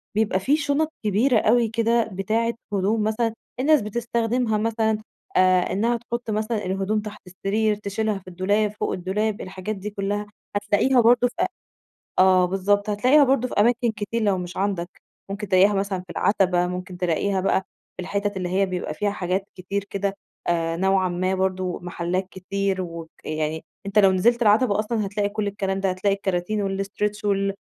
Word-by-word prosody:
بيبقى 210 Hz, -3 st, +2 dB
في 285 Hz, +9 st, +2 dB
شُنَط 295 Hz, +1 st, 0 dB
كبيرة 220 Hz, +6 st, +3 dB
أوي 235 Hz, +1 st, +3 dB
كده 230 Hz, +1 st, +2 dB
بتاعة 225 Hz, +5 st, 0 dB, 0.2 s
هدوم 205 Hz, +3 st, +1 dB
مثلًا 220 Hz, +1 st, 0 dB, 0.3 s
الناس 295 Hz, 0 st, +4 dB
بتستخدمها 230 Hz, +1 st, 0 dB
مثلًا 220 Hz, 0 st, +1 dB, 0.4 s
آآ، 185 Hz, -1 st, +4 dB
إنها 230 Hz, +4 st, +1 dB
تحُط 235 Hz, 0 st, -5 dB
مثلًا 215 Hz, -1 st, -1 dB
الهدوم 195 Hz, +3 st, 0 dB
تحت 210 Hz, 0 st, -9 dB
السرير، 210 Hz, +4 st, 0 dB
تشِيلها 210 Hz, 0 st, -2 dB
في 185 Hz, -, -25 dB
الدولاب، 205 Hz, +4 st, +1 dB
فوق -, -, -1 dB
الدولاب، 205 Hz, +4 st, -1 dB
الحاجات 190 Hz, +3 st, -5 dB
دي 200 Hz, +2 st, -5 dB
كلّها، 205 Hz, 0 st, -2 dB, 0.3 s
هتلاقيها 210 Hz, +5 st, +3 dB
برضه 245 Hz, +2 st, +5 dB
في 245 Hz, -, -11 dB
أ -, -, +4 dB, 0.7 s
آه 185 Hz, -1 st, +6 dB
بالضبط، 200 Hz, +3 st, +1 dB
هتلاقيها 255 Hz, +8 st, +5 dB
برضه 260 Hz, -2 st, +2 dB
في -, -, -8 dB
أماكن 235 Hz, +1 st, +3 dB
كتير 215 Hz, +2 st, -3 dB
لو 200 Hz, -3 st, +2 dB
مش 180 Hz, 0 st, -6 dB
عَندك، 190 Hz, -3 st, -1 dB, 0.4 s
ممكن 205 Hz, +1 st, -4 dB
تلاقيها 195 Hz, +2 st, +5 dB
مثلًا 195 Hz, -1 st, -1 dB
في 180 Hz, -1 st, -13 dB
العَتَبة، 180 Hz, -1 st, +2 dB
ممكن 180 Hz, 0 st, -5 dB
تلاقيها 185 Hz, +2 st, 0 dB
بقى 190 Hz, -, +2 dB, 0.4 s
في 185 Hz, -, -4 dB
الحِتَت 200 Hz, +1 st, -2 dB
اللي 180 Hz, -1 st, -2 dB
هي 195 Hz, +2 st, +2 dB
بيبقى 180 Hz, -1 st, -3 dB
فيها 205 Hz, -1 st, -1 dB
حاجات 190 Hz, 0 st, -1 dB
كتير 190 Hz, +2 st, -3 dB
كده 200 Hz, 0 st, -2 dB, 0.3 s
آآ 165 Hz, -1 st, 0 dB
نوعًا 190 Hz, 0 st, +2 dB
ما 185 Hz, +2 st, 0 dB
برضه، 185 Hz, -1 st, -1 dB
محلّات 175 Hz, +1 st, -2 dB
كتير 195 Hz, 0 st, -2 dB
وك 165 Hz, -2 st, -7 dB, 0.2 s
يعني 155 Hz, 0 st, -2 dB, 0.2 s
أنت 200 Hz, +1 st, +2 dB
لو 195 Hz, -2 st, +6 dB
نزِلت 235 Hz, +6 st, +2 dB
العَتَبة 210 Hz, 0 st, +4 dB
أصلًا 215 Hz, 0 st, -1 dB
هتلاقي 205 Hz, +1 st, -1 dB
كلّ 210 Hz, 0 st, -2 dB
الكلام 195 Hz, -1 st, -2 dB
ده، 195 Hz, -, +1 dB
هتلاقي 190 Hz, +2 st, +1 dB
الكَراتين 195 Hz, +1 st, -1 dB
والstretch 210 Hz, +1 st, -3 dB
وال 195 Hz, -1 st, +1 dB
200 Hz, 170 wpm, -24 LUFS, 185-220 Hz, 0.7 s, آه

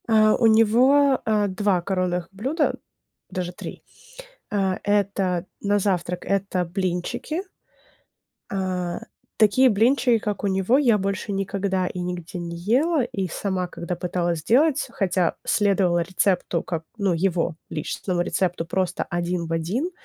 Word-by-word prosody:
Э, 215 Hz, -1 st, +5 dB
у 230 Hz, -, +5 dB
него, 255 Hz, +6 st, +5 dB
э, 210 Hz, -2 st, +2 dB
2 190 Hz, -1 st, +1 dB
коронных 180 Hz, -1 st, -1 dB
блюда, 270 Hz, -, 0 dB, 0.5 s
даже 180 Hz, -1 st, -3 dB
3. -, -, -9 dB, 0.7 s
Э, 195 Hz, -2 st, +1 dB
это 195 Hz, -3 st, +1 dB, 0.2 s
на 205 Hz, 0 st, +2 dB
завтрак 180 Hz, -3 st, -1 dB
это 195 Hz, -2 st, 0 dB
блинчики. 185 Hz, -, -2 dB, 1.1 s
Э, 185 Hz, -3 st, -2 dB, 0.4 s
такие 230 Hz, +5 st, +5 dB
блинчики, 235 Hz, +2 st, +3 dB
как 210 Hz, -1 st, -3 dB
у -, -, +2 dB
него, 195 Hz, +6 st, +2 dB
я 245 Hz, -7 st, +4 dB
больше 200 Hz, +1 st, -2 dB
никогда 195 Hz, -1 st, -1 dB
и 180 Hz, -, -5 dB
нигде 180 Hz, 0 st, -5 dB
не 170 Hz, -1 st, -5 dB
ела. 260 Hz, -, +2 dB
И 220 Hz, -6 st, -3 dB
сама 185 Hz, +1 st, -2 dB
когда 175 Hz, 0 st, -5 dB
пыталась 175 Hz, -1 st, -1 dB
сделать, 265 Hz, -, +2 dB
хотя 180 Hz, -3 st, 0 dB
следовала 195 Hz, -4 st, +2 dB
рецепту, 180 Hz, -1 st, 0 dB
как 165 Hz, -2 st, -4 dB
ну, 200 Hz, -4 st, +1 dB
его 170 Hz, -1 st, 0 dB
личностному 175 Hz, +3 st, -2 dB
рецепту 175 Hz, -1 st, -1 dB
просто 185 Hz, +1 st, -1 dB
один 175 Hz, -1 st, -2 dB
в 165 Hz, -, -3 dB
один, 190 Hz, -, -1 dB
190 Hz, 135 wpm, -24 LUFS, 180-215 Hz, 1.1 s, Э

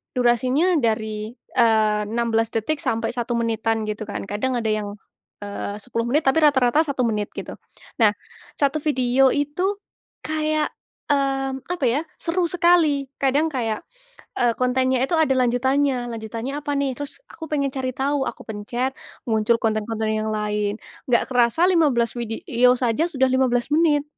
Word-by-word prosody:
durasinya 255 Hz, +8 st, +2 dB
dari, 220 Hz, -1 st, -1 dB, 0.2 s
eee, 215 Hz, -2 st, +4 dB
16 225 Hz, 0 st, 0 dB
detik 255 Hz, +8 st, -1 dB
sampai 225 Hz, 0 st, 0 dB
1 240 Hz, 0 st, -3 dB
menitan 225 Hz, -1 st, 0 dB
gitu 215 Hz, +1 st, -4 dB
kan, 205 Hz, -, -4 dB
kadang 215 Hz, +6 st, -1 dB
ada 225 Hz, -, -2 dB
yang, 210 Hz, -1 st, -2 dB, 0.5 s
eee, 205 Hz, 0 st, -5 dB
10 230 Hz, -2 st, -2 dB
menit 295 Hz, +5 st, +2 dB
tapi 270 Hz, +4 st, +4 dB
rata-rata 280 Hz, 0 st, +4 dB
1 280 Hz, -4 st, -1 dB
menit 210 Hz, -2 st, -1 dB
gitu. -, -, -6 dB, 0.4 s
Nah, 220 Hz, -3 st, +6 dB, 0.5 s
1 285 Hz, +1 st, +2 dB
video 260 Hz, -2 st, +3 dB
itu, 360 Hz, +8 st, -1 dB, 0.5 s
kayak, 310 Hz, 0 st, 0 dB, 0.4 s
eee, 270 Hz, -1 st, +1 dB
apa 350 Hz, -6 st, -2 dB
ya, 240 Hz, +4 st, +2 dB, 0.2 s
seru 350 Hz, +1 st, 0 dB
sekali, 335 Hz, -6 st, +3 dB
kadang 280 Hz, +4 st, +3 dB
kayak, 230 Hz, -7 st, -2 dB, 0.6 s
eee, 240 Hz, -1 st, +3 dB
kontennya 255 Hz, 0 st, +2 dB
itu 335 Hz, -, 0 dB
ada 315 Hz, -4 st, +3 dB
lanjutannya, 255 Hz, 0 st, +1 dB
lanjutannya 225 Hz, +4 st, -5 dB
apa 290 Hz, -, -3 dB
nih, 275 Hz, -1 st, 0 dB
terus 290 Hz, -1 st, -7 dB
aku 325 Hz, -, -8 dB
pengen 280 Hz, -2 st, 0 dB
cari 260 Hz, -1 st, -2 dB
tahu, 275 Hz, 0 st, 0 dB
aku -, -, -11 dB
pencet 240 Hz, +5 st, -2 dB, 0.4 s
muncul 220 Hz, +1 st, +2 dB
konten-konten 220 Hz, 0 st, -1 dB
yang 215 Hz, 0 st, -1 dB
lain, 210 Hz, -1 st, -1 dB, 0.3 s
enggak 235 Hz, -, +3 dB
kerasa 245 Hz, +6 st, +3 dB
15 285 Hz, -10 st, +2 dB
video 245 Hz, -, +2 dB
saja 250 Hz, +6 st, +1 dB
sudah 265 Hz, -5 st, +1 dB
15 255 Hz, -2 st, +1 dB
menit 300 Hz, -2 st, +3 dB
250 Hz, 150 wpm, -22 LUFS, 225-285 Hz, 0.6 s, Nah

